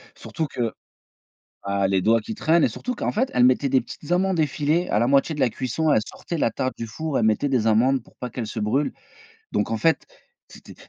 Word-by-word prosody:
surtout 160 - -4
que 120 -5 -2 0.9
ah, 100 0 0
les 95 -1 +2
doigts 115 +1 +4
qui 220 - -6
traînent 165 -4 +3
et - - +4
surtout 250 0 -5
qu'en - - -2
fait 255 +5 0
elle 125 0 +4
mettait 130 +2 +3
des 130 -1 +3
petites 145 +6 -10
amandes 185 -1 +2
effilées 155 +4 0
à 105 - +1
la 120 - +2
moitié 140 +4 +3
de - - -4
la 125 - +4
cuisson, 135 +6 -1
elle 110 - +4
sortait 170 - -6
la 115 - +2
tarte 130 +3 -2
du 115 - -5
four, 155 +5 -3
elle - - +1
mettait 110 +6 +2
des 120 -5 +1
amandes 125 +4 +3
pour - - -23
pas 125 - -5
qu'elles 120 -2 -4
se - - -5
brûlent. 130 +8 0 0.6
Donc - - 0
en 115 - 0
fait, 165 +5 +1 0.4
c'était - - -14
130 Hz, 230 wpm, -23 LUFS, 115-160 Hz, 0.9 s, doigts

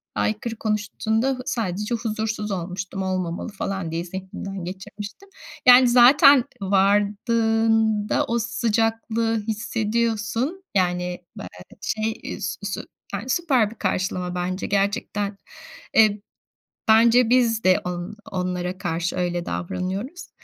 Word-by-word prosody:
aykırı 220 +2 -1
konuştuğunda 220 +4 -1
sadece 210 -3 -2
huzursuz 220 -2 -3
olmuştum, 190 +1 -4
olmamalı 185 +1 -2
falan 195 -4 -4
diye 165 +1 -2
zihnimden 190 +1 -6
geçirmiştim. 205 - -8 0.4
Yani, 250 0 +8
zaten 255 +2 +7 0.2
vardığında 210 +2 +2
o 235 +1 0
sıcaklığı 225 0 0
hissediyorsun. 225 - -1
Yani 180 -1 0
bel - - -6 0.3
şey, 220 +1 -1
eee, - - -6
sü 185 - -3
su 195 - -3 0.3
yani, 205 +6 -4
süper 260 -9 +2
bir - - -11
karşılama 185 -3 -2
bence 180 +1 -2
gerçekten. 200 0 -1 0.6
Eee, 215 -2 +5 0.7
bence 230 +2 +5
biz 235 -3 +3
de 185 0 +5
on 180 +4 -5 0.2
onlara 180 0 -2
karşı 175 +1 -2
öyle 175 -1 -1
davranıyoruz. 190 - -4
210 Hz, 110 wpm, -23 LUFS, 185-230 Hz, 0.7 s, Yani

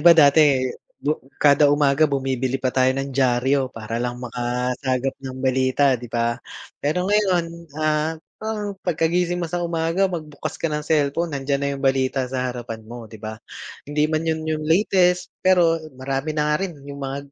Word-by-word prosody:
ba, 170 -1 +7
dati, 145 -3 +6 0.3
bu 150 +2 -1 0.2
kada 145 0 +5
umaga 145 +1 +3
bumibili 135 -2 -1
pa 130 -1 -1
tayo 130 -1 +3
ng 135 0 -3
diaryo 130 +1 +2
para 115 0 -5
lang 120 0 -2
makasagap 125 +2 -2
ng 130 -1 -7
balita, 130 +1 +3
'di 120 -1 -4
ba. 115 0 -1 0.4
Pero 155 +5 0
ngayon, 195 -3 +2 0.3
ah, 155 +1 0 0.2
parang 215 -2 -3
pagkagising 175 0 +1
mo 175 - -2
sa 175 +2 -3
umaga, 170 +2 +1
magbukas 155 -5 -5
ka 165 - -2
ng 150 - -1
cellphone, 150 +1 0
nandiyan 140 0 -1
na 140 - 0
yung 135 - -6
balita 135 0 +2
sa 130 0 -2
harapan 120 -2 -6
mo, 120 0 -8
'di 110 -1 -12
ba. 110 0 -6 0.5
Hindi 150 +1 0
man 155 +1 0
yun 160 -1 0
yung 155 -1 -1
latest, 180 +1 +3 0.2
pero 175 -3 +5 0.2
marami 135 +3 -2
na 150 0 0
nga 150 +6 +1
rin 185 - -4 0.2
yung 140 0 -7
mga 135 +1 -3
140 Hz, 175 wpm, -22 LUFS, 130-165 Hz, 0.5 s, ba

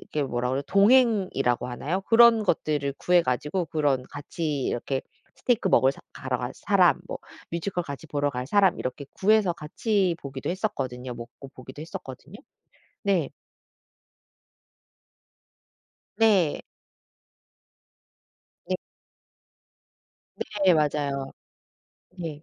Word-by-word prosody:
이렇게 150 - +2
뭐라 125 -2 -2
그래요? 135 +2 0
동행이라고 200 - +3
하나요? 150 +9 -3
그런 230 +1 +6
것들을 150 -6 0
구해 175 0 +4
가지고 150 +8 -1
그런 145 -5 0
같이 145 -1 -4
이렇게 130 +2 -2 0.3
'스테이크 235 -5 +1
먹을 135 -5 +5
사 - - -15
가러 - - -3
갈 - - -4
사람' - - +3
뭐 - - -4 0.3
'뮤지컬 175 +2 -2
같이 140 0 -7
보러 145 -1 -1
갈 125 -2 -4
사람' 195 +4 +3
이렇게 130 +3 -4
구해서 205 -2 +3
같이 180 +3 0
보기도 135 +1 -5
했었거든요. 130 - -3
먹고 120 +3 -10
보기도 130 +3 -10
했었거든요. 155 +3 -9 0.7
네. 190 -8 +1 2.9
네. 205 -8 +3 2.1
네. 185 - +1 1.9
네 185 - +7
맞아요. 150 -2 +1 1.1
네. 160 -4 -6
155 Hz, 240 characters per minute, -26 LUFS, 135-190 Hz, 2.9 s, 네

